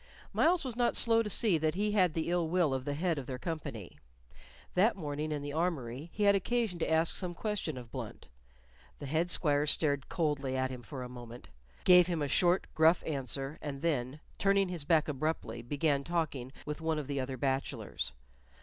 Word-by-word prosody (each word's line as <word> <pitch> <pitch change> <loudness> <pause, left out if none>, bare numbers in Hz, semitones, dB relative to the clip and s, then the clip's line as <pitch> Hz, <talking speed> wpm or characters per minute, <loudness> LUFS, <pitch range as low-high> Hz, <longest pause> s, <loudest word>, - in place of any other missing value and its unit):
Myles 340 -2 +3
was 250 -3 -4
not 240 0 +1
slow 230 -1 +5
to 215 - -3
see 205 -5 +4
that 155 +1 0
he 210 +2 0
had 185 -6 +3
the 165 +1 -1
ill 175 -2 +1
will 170 -4 +2
of 130 -1 -3
the 145 - -2
head 165 -1 0
of 130 - -8
their 130 - -4
company. 125 - -6 0.7
That 210 +6 +4
morning 150 -3 -3
in 145 -1 -3
the 145 0 -5
armory 155 -4 -2
he 210 - -2
had 200 0 +6
occasion 205 -1 0
to - - -1
ask 160 +1 +3
some 180 -2 -3
question 205 -8 -2
of 120 -2 -9
Blunt; - - -7 0.7
the - - -8
head 160 +5 0
squire 150 -4 +1
stared 145 -2 +1
coldly 145 -5 -1
at 130 0 0
him 125 -1 -7
for 130 +1 -7
a - - -6
moment, 120 -1 -10 0.3
gave 180 -1 +7
him 170 -4 -1
a - - 0
short, 175 +5 +3
gruff 160 +2 +4
answer, 135 0 -3
and 140 0 -6
then, 140 -3 -1 0.2
turning 195 -1 +3
his 170 -5 -4
back 160 0 +3
abruptly, 150 -4 -2
began 140 +3 0
talking 150 -6 -2
with 150 +1 -5
one 160 -1 0
of 150 - -3
the 140 0 -2
other 130 0 -3
bachelors. 135 - -2
155 Hz, 200 wpm, -32 LUFS, 135-180 Hz, 0.7 s, gave